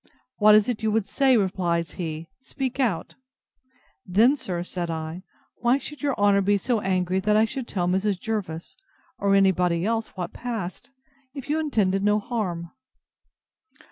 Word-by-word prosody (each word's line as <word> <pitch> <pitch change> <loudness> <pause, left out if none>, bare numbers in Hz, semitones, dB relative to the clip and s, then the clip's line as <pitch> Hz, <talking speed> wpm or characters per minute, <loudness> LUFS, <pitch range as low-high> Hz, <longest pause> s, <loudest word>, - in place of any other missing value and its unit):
What 210 0 +7
is 215 0 +4
it 240 -3 -2
you 220 - +1
would 215 -1 +1
say? 265 -3 +3
replies 175 -5 0
he; 160 -2 -5
speak 265 0 -5
out. 220 -11 0 0.9
Then, 220 +10 +4
sir, 180 -10 -4
said 175 -1 -4
I, 160 +2 -4 0.4
why 240 +2 +3
should 295 +1 -8
your 285 -2 0
honour 200 -1 +4
be 205 +1 +3
so 230 +3 0
angry 185 -1 0
I 215 +1 +4
should 255 +2 -5
tell 175 -3 -1
Mrs. 190 +1 0
Jervis, 185 -7 -4 0.4
or 200 0 +3
any 195 -1 +5
body 175 -1 0
else, 225 -1 -2
what 175 -2 -4
passed, 220 -7 -5 0.5
if 275 +1 -5
you 310 - +1
intended 200 -11 +1
no 210 0 +3
harm? 190 -7 -3
200 Hz, 160 wpm, -25 LUFS, 180-230 Hz, 0.9 s, What